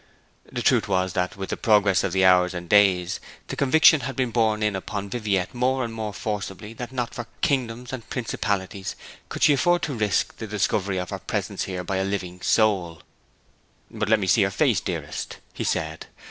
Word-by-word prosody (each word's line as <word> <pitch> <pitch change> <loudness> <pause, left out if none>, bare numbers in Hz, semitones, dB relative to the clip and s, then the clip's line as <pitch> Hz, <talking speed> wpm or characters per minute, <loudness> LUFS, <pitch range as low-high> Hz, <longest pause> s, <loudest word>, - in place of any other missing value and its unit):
The - - -3
truth - - +3
was 95 -2 0
that, 90 +1 -1
with 95 -1 -5
the - - -2
progress 105 -3 +3
of - - -1
the 95 +1 +3
hours 90 0 +5
and 85 0 -6
days, 95 -2 +3 0.3
the - - -3
conviction 155 +3 +5
had 135 0 -5
been 125 -2 0
borne 110 -2 +1
in 105 -2 +1
upon 100 +1 -5
Viviette 100 -6 -1
more 130 +1 +1
and 115 - -6
more 110 -2 -4
forcibly 105 0 -5
that 120 +1 -7
not 125 -2 -3
for 120 -1 -6
kingdoms 125 -2 -1
and 120 -4 -7
principalities 100 -5 -3 0.3
could - - -3
she 150 - +7
afford 175 +5 +2
to 155 -3 -1
risk 105 -6 0
the 110 - -6
discovery 100 -1 0
of 90 -1 -4
her - - -4
presence - - -3
here 90 -1 -4
by 95 +2 -2
any 95 +1 -1
living 90 -2 -4
soul. 95 -7 +1 0.9
'But 105 -1 -2
let 110 -1 +5
me 100 - -1
see 95 +4 +4
your 100 - +3
face, 95 - +2
dearest,' - - -5 0.2
he - - -4
said. - - -2
105 Hz, 200 wpm, -24 LUFS, 95-120 Hz, 0.9 s, she